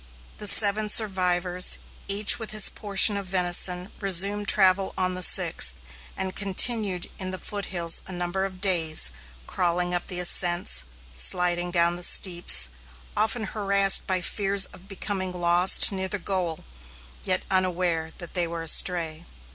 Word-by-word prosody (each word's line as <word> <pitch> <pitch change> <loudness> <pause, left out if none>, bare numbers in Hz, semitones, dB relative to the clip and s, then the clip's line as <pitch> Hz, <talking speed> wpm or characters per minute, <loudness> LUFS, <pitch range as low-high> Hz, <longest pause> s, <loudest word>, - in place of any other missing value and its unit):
The 210 - 0
seven 210 +1 +2
survivors, 180 -4 0 0.3
each 205 +3 +3
with 225 - -7
his 215 -2 +3
portion 205 0 +3
of 200 -1 -7
venison, 180 0 0
resumed 200 +1 +2
travel 190 -1 +1
on 185 0 -2
the 185 - -7
sixth 165 - +4 0.4
and 190 0 -5
continued 200 -1 0
in 185 -1 -5
the 185 - -7
foothills 180 -5 -4
a - - -7
number 175 +1 -5
of 185 -1 -8
days, 165 - +4 0.3
crawling 175 - -3
up 175 - -5
the 180 -2 -4
ascents, 175 - +1 0.3
sliding 175 - +1
down 170 0 -1
the - - -10
steeps; 170 - +2 0.5
often 220 +2 -2
harassed 200 -1 +2
by 185 -1 -1
fears 195 +1 -1
of 185 - -16
becoming 195 -1 -6
lost 175 +2 +3
near 190 -1 -5
the 205 - -4
goal, 180 -3 -6 0.6
yet 185 -1 -2
unaware 180 -3 -3
that 175 -2 -11
they 175 -2 -2
were 165 0 -8
astray. 165 0 +2
185 Hz, 145 wpm, -23 LUFS, 175-195 Hz, 0.6 s, sixth